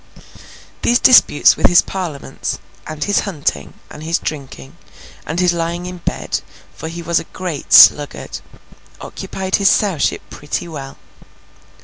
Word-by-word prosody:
These 240 - +3
disputes 250 - +5
with - - +3
his 175 - +5
Parliaments, 175 -7 -5 0.3
and 155 -1 -5
his 205 - +1
hunting, 165 -7 -3
and 150 - -12
his 165 +2 -1
drinking, 135 - -7 0.5
and 160 +3 -3
his 180 -1 +2
lying 170 +1 -3
in 180 0 -7
bed—for 160 - -6
he 170 +1 -7
was 170 0 +1
a - - -7
great 175 -6 -7
sluggard—occupied 190 +5 +1
his 200 -1 +3
Sowship 190 -8 0
pretty 145 +3 -5
well. 140 -4 -9
170 Hz, 125 wpm, -17 LUFS, 150-180 Hz, 0.5 s, disputes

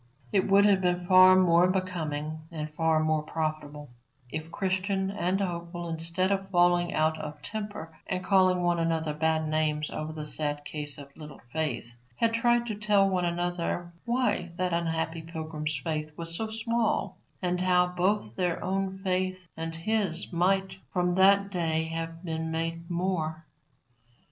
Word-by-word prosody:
It 190 - +2
would 200 +1 +6
have 200 -2 +4
been 180 -1 0
far 185 +1 +8
more 175 -1 +5
becoming 160 -5 -2
and 155 -2 -5
far 160 0 +2
more 155 0 +1
profitable 155 -3 -4 0.4
if 155 +1 -5
Christian 190 +1 -1
and 190 -1 0
Hopeful, 175 -2 -3
instead 170 +4 0
of 195 -1 -1
falling 175 -1 +3
out 155 0 +1
of 150 -1 -6
temper 205 -4 -6
and 185 0 -2
calling 185 -2 +4
one 175 -1 +2
another 165 -2 0
bad 160 +1 +1
names 155 -1 0
over 155 +1 -4
the 155 -1 -5
sad 145 -1 -2
case 150 -2 -4
of 140 -1 -12
Little 150 -2 -10
Faith, 145 -7 -2 0.2
had 230 - +1
tried 240 +1 +3
to 225 - -3
tell 205 -1 +3
one 185 -2 +1
another 175 0 -2
why 240 -7 0
that 180 -1 -1
unhappy 165 -1 -1
pilgrim's 155 -2 -4
faith 155 -1 -2
was 165 0 -3
so 220 +4 -2
small, 230 0 -1 0.2
and 180 -1 -1
how 180 -1 +4
both 180 - 0
their 175 -2 -1
own 190 +1 -1
faith 185 -1 -1
and 165 0 -4
his 185 -1 -1
might 190 +2 +1
from 180 -1 +1
that 200 +2 +5
day 165 -3 0
have 165 +1 -5
been 160 -1 -3
made 165 +1 -3
more. 170 -3 -2
175 Hz, 160 wpm, -28 LUFS, 160-190 Hz, 0.4 s, far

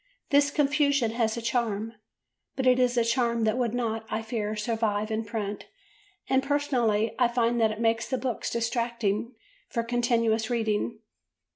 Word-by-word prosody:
This 285 0 +5
confusion 285 -4 +2
has 225 -1 0
a 235 - -5
charm, 225 -2 -1 0.6
but 265 - -2
it 255 0 +5
is 250 -1 +2
a 235 - +3
charm 235 -1 +1
that 220 0 +2
would 245 -2 0
not, 225 -2 -1
I 225 - -2
fear, 215 -2 -3
survive 215 -1 -1
in 220 +1 -1
print 210 -2 -4 0.6
and, 265 0 +3
personally, 255 -7 +1
I 245 - +5
find 235 0 +1
that 220 - +4
it 215 0 -5
makes 230 0 +1
the 260 - 0
books 245 -1 -2
distracting 235 -1 -1 0.3
for 235 - -1
continuous 230 -2 +1
reading. 220 -1 -1
230 Hz, 160 wpm, -27 LUFS, 220-245 Hz, 0.6 s, This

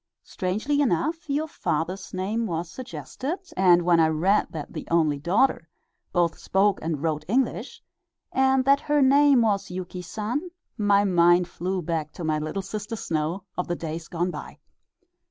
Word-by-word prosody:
Strangely 220 +11 -1
enough 290 - 0
your 295 +3 0
father's 175 - -3
name 210 +5 -2
was 170 -1 -3
suggested, 260 - -5 0.2
and 180 -2 +5
when 170 -1 +4
I 160 - +5
read 175 +7 +2
that 155 -3 -7
the - - -6
only 155 -4 +2
daughter 195 - +1 0.4
both 175 -2 +1
spoke 195 +1 +2
and 160 -2 -3
wrote 155 -2 -1
English, 255 +7 -1 0.5
and 265 0 +3
that 275 +1 +5
her 295 -1 +2
name 275 -2 +5
was 205 -3 0
Yuki 180 0 -6
San, 220 - -3 0.3
my 205 -2 +3
mind 175 -2 +4
flew 180 +1 -3
back 155 -2 -3
to 175 - -7
my 155 -1 0
"Little 155 +6 -3
Sister 210 +3 -5
Snow" 165 -1 -2
of 180 - -2
the 175 - -1
days 165 0 -5
gone 175 +1 -1
by. - - -8
185 Hz, 160 wpm, -25 LUFS, 170-235 Hz, 0.5 s, and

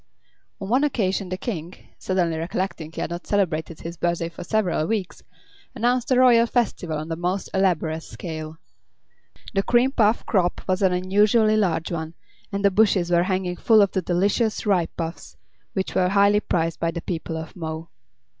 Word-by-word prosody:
On 195 - -5
one 255 +7 +2
occasion 195 -9 0
the 185 - -3
King, 180 -5 -5 0.2
suddenly 180 -3 0
recollecting 165 -1 -3
he - - -6
had - - -3
not 175 +1 -6
celebrated 165 -5 -1
his 170 +1 -7
birthday 170 0 -1
for 170 - -9
several 180 -5 0
weeks, 210 -5 -3 0.5
announced 245 +1 +1
a 255 -1 +4
royal 235 -2 +6
festival 195 -10 -1
on 155 +2 -6
a - - -1
most 180 +3 -2
elaborate 170 -4 +1
scale. 160 -2 -7 1.0
The 195 - +2
cream 245 +5 +3
puff 225 -3 +2
crop 180 -4 +1
was 185 +1 0
an 190 -2 +4
unusually 205 +4 +3
large 170 -6 0
one, 160 -1 -4 0.4
and 200 0 -1
the 200 - +5
bushes 190 -4 +3
were 170 0 +4
hanging 185 -2 -1
full 220 +3 +4
of 200 - 0
the 190 - 0
delicious 200 +6 0
ripe 185 -5 +1
puffs, 165 0 -6 0.4
which 190 -1 -2
were 180 -1 +2
highly 200 +1 +4
prized 165 -5 -1
by 165 - 0
the 170 0 -4
people 165 -2 -4
of 160 0 -8
Mo. 160 -1 -6
185 Hz, 175 wpm, -23 LUFS, 165-205 Hz, 1.0 s, royal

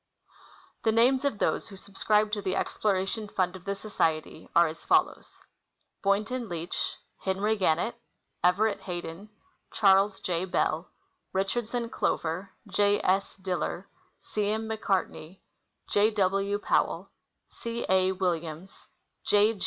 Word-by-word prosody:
The 220 - +4
names 250 +4 +4
of 275 -7 +1
those - - 0
who 195 - -10
subscribed 210 +2 +1
to 205 - 0
the 190 -1 -1
exploration 205 +1 0
fund 185 -2 0
of 185 0 -11
the 200 0 -1
Society 165 -6 -2
are 170 - +7
as 160 0 -5
follows: - - +1 0.6
Boynton 215 +4 0
Leach. 170 0 -3 0.2
Henry 200 +3 0
Gannett. 200 +5 +1 0.4
Everett 200 +4 +3
Hayden. 175 +2 -6 0.4
Charles 195 -1 +4
J. 175 0 -1
Bell. 175 -2 0 0.4
Richardson 230 +5 -1
Clover. 185 -3 -1 0.2
J. 205 +1 +3
S. 195 +2 +1
Diller. 185 -1 -3 0.4
C. 210 -1 -1
M. 220 +1 -1
McCarteney. 195 -5 -2 0.3
' - - -50
J. 205 +1 +5
W. 200 -1 +1
Powell. 205 - 0 0.4
C. 235 0 -4
A. 190 0 +3
Williams. 175 -1 -3 0.4
J. 210 +2 +4
195 Hz, 125 wpm, -28 LUFS, 185-215 Hz, 0.6 s, are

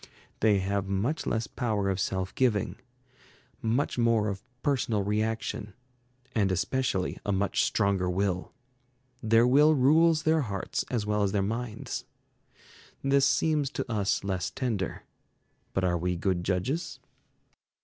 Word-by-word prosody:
They 105 -2 +4
have 95 0 -1
much 100 +11 -1
less 115 0 0
power 105 -5 -1
of 95 -1 0
self 95 0 -2
giving, 105 -7 +1 0.8
much 120 +2 0
more 115 -2 +3
of 100 -1 -4 0.2
personal 125 -7 +1
reaction; 105 -1 -2 0.6
and 100 -4 +2
especially 95 0 -1
a 100 - -1
much 100 +1 +1
stronger 100 -4 +1
will. 90 0 -1 0.7
Their 115 +1 +4
will 150 +5 +5
rules 155 +4 +4
their 160 0 +3
hearts 100 -7 -3
as 115 -4 -1
well 105 0 0
as 100 -1 +1
their 100 -2 +2
minds. 115 +2 -4 1.0
This 135 0 +4
seems 150 -4 +1
to 135 -3 -4
us 105 -3 0
less 95 -2 -2
tender. 110 -9 -3 0.7
But 95 - -1
are 90 -1 +1
we 90 +1 -1
good 90 0 -1
judges? 110 - -2
105 Hz, 135 wpm, -28 LUFS, 95-125 Hz, 1.0 s, will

